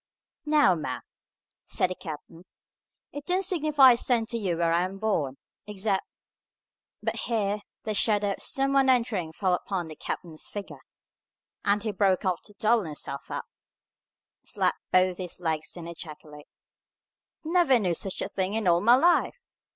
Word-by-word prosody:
"Now, 295 Hz, -11 st, +5 dB
ma'am," 160 Hz, -3 st, -4 dB, 0.6 s
said 185 Hz, -, 0 dB
the -, -, -3 dB
captain, 165 Hz, +1 st, -9 dB, 0.7 s
"it 290 Hz, -, -7 dB
don't 365 Hz, +4 st, 0 dB
signify 305 Hz, -7 st, +5 dB
a 240 Hz, -, +3 dB
cent 235 Hz, -2 st, +1 dB
to 235 Hz, -, -2 dB
you 180 Hz, -5 st, -1 dB
where 165 Hz, -1 st, +2 dB
I 175 Hz, +2 st, +2 dB
was 195 Hz, +1 st, -10 dB
born, 155 Hz, -11 st, -1 dB, 0.3 s
except 200 Hz, -1 st, 0 dB, 0.5 s
" -, -, -47 dB
But -, -, -1 dB
here 210 Hz, -3 st, 0 dB, 0.2 s
the 215 Hz, -, -2 dB
shadow 205 Hz, -1 st, +2 dB
of -, -, -5 dB
some 275 Hz, 0 st, 0 dB
one 270 Hz, -1 st, +4 dB
entering 230 Hz, -10 st, +1 dB
fell 185 Hz, +2 st, 0 dB
upon 180 Hz, -2 st, -2 dB
the 155 Hz, -, -8 dB
captain's 160 Hz, 0 st, -5 dB
figure, 205 Hz, -1 st, -7 dB, 0.8 s
and 205 Hz, 0 st, +2 dB
he 220 Hz, -, -1 dB
broke 195 Hz, -1 st, +1 dB
off 185 Hz, -1 st, 0 dB
to 205 Hz, -, -12 dB
double 220 Hz, -2 st, +2 dB
himself 145 Hz, -2 st, -6 dB
up, -, -, -4 dB, 1.0 s
slap -, -, 0 dB, 0.2 s
both 185 Hz, 0 st, +3 dB
his 180 Hz, -2 st, -5 dB
legs, 160 Hz, -1 st, -3 dB
and 170 Hz, -1 st, -7 dB
ejaculate, 155 Hz, -3 st, -9 dB, 1.0 s
"Never 325 Hz, -5 st, +4 dB
knew 185 Hz, -6 st, 0 dB
such 190 Hz, +3 st, -3 dB
a -, -, -2 dB
thing 190 Hz, +2 st, -2 dB
in 220 Hz, -3 st, 0 dB
all 170 Hz, 0 st, +4 dB
my 235 Hz, +3 st, +7 dB
life! 345 Hz, -, +3 dB
195 Hz, 165 wpm, -27 LUFS, 175-235 Hz, 1.0 s, my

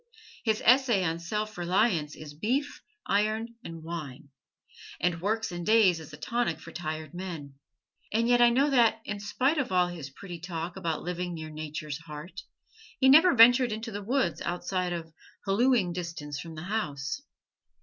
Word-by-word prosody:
His 220 Hz, -2 st, 0 dB
"Essay 245 Hz, -5 st, +5 dB
on 165 Hz, -1 st, -1 dB
Self 210 Hz, +5 st, -3 dB
Reliance" 175 Hz, -4 st, +1 dB
is 150 Hz, -1 st, -10 dB
beef, 250 Hz, -, -1 dB, 0.2 s
iron 215 Hz, +3 st, +1 dB
and 165 Hz, -1 st, -8 dB
wine, 155 Hz, -5 st, -7 dB, 0.7 s
and 170 Hz, 0 st, 0 dB
"Works 220 Hz, +2 st, -1 dB
and 175 Hz, 0 st, -5 dB
Days" 210 Hz, -4 st, +4 dB
is 160 Hz, -1 st, -11 dB
a 150 Hz, -, -10 dB
tonic 235 Hz, -8 st, -1 dB
for 170 Hz, -, -11 dB
tired 155 Hz, -2 st, -5 dB
men; 170 Hz, -6 st, -6 dB, 0.6 s
and 230 Hz, +2 st, +2 dB
yet 245 Hz, 0 st, +4 dB
I 240 Hz, -, +8 dB
know 275 Hz, +5 st, +3 dB
that, 230 Hz, -4 st, +4 dB
in 210 Hz, -1 st, -4 dB
spite 260 Hz, +9 st, +1 dB
of 265 Hz, -, -2 dB
all 180 Hz, -1 st, +3 dB
his 165 Hz, -6 st, -7 dB
pretty 175 Hz, +5 st, -9 dB
talk 170 Hz, 0 st, -5 dB
about 165 Hz, -2 st, -3 dB
living 180 Hz, 0 st, -3 dB
near 155 Hz, -1 st, -7 dB
Nature's 155 Hz, -1 st, -5 dB
heart, 165 Hz, +3 st, -9 dB, 0.6 s
he 265 Hz, -, +5 dB
never 325 Hz, +5 st, +7 dB
ventured 245 Hz, +1 st, +7 dB
into 220 Hz, +2 st, -4 dB
the 205 Hz, 0 st, -5 dB
woods 260 Hz, +6 st, 0 dB
outside 180 Hz, +1 st, -2 dB
of 165 Hz, -2 st, -5 dB, 0.3 s
hallooing 210 Hz, -2 st, +3 dB
distance 165 Hz, -5 st, -5 dB
from 165 Hz, -2 st, -8 dB
the 155 Hz, -, -7 dB
house. 155 Hz, -, -3 dB
180 Hz, 170 wpm, -28 LUFS, 160-225 Hz, 0.7 s, I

